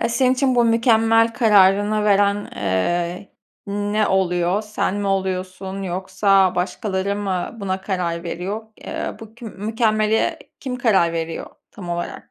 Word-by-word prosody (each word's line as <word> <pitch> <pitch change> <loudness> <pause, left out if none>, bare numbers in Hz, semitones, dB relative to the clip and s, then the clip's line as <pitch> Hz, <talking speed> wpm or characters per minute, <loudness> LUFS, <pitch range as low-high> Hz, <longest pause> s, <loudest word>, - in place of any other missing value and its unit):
Eee, - - +1
senin 255 +2 +2
için 260 -1 +1
bu 240 -1 +4
mükemmel 225 0 +3
kararını 210 -1 +4
veren, 205 0 +2
eee, 175 - -1 0.3
ne 205 +1 0
oluyor? 185 +1 +1
Sen 210 -2 -2
mi 205 -1 -2
oluyorsun 190 0 -3
yoksa 190 +1 +2
başkaları 190 +2 -2
mı 195 +1 -3
buna 190 -1 -2
karar 175 -4 -2
veriyor? 190 +6 -4 0.2
Eee, - - -4
bu 220 0 -12
kü 240 - -12
mükemmele 215 +1 0 0.2
kim 255 -2 -4
karar 195 -9 +3
veriyor 165 0 -4 0.2
tam 185 -4 -10
olarak? 175 0 -5
200 Hz, 135 wpm, -21 LUFS, 185-220 Hz, 0.3 s, bu